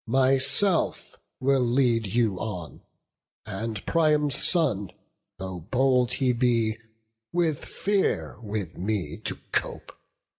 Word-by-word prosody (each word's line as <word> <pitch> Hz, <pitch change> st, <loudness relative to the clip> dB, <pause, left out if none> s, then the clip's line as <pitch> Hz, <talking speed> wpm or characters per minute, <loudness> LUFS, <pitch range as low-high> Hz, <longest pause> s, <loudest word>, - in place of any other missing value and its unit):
Myself 135 Hz, -, +2 dB, 0.2 s
will 135 Hz, 0 st, +2 dB
lead 120 Hz, -2 st, +2 dB
you 110 Hz, -3 st, +1 dB
on; 90 Hz, -, -6 dB, 0.6 s
and 110 Hz, +1 st, -4 dB
Priam's 150 Hz, -3 st, +2 dB
son, 135 Hz, -, +1 dB, 0.5 s
Though 95 Hz, -1 st, -6 dB
bold 125 Hz, -1 st, +2 dB
he 125 Hz, -1 st, +2 dB
be, 115 Hz, -2 st, +1 dB, 0.5 s
will 170 Hz, -2 st, +2 dB
fear 145 Hz, -, -1 dB
with 105 Hz, -6 st, -5 dB
me 100 Hz, 0 st, -2 dB
to -, -, -4 dB, 0.2 s
cope. -, -, -2 dB
120 Hz, 105 wpm, -26 LUFS, 105-135 Hz, 0.6 s, Myself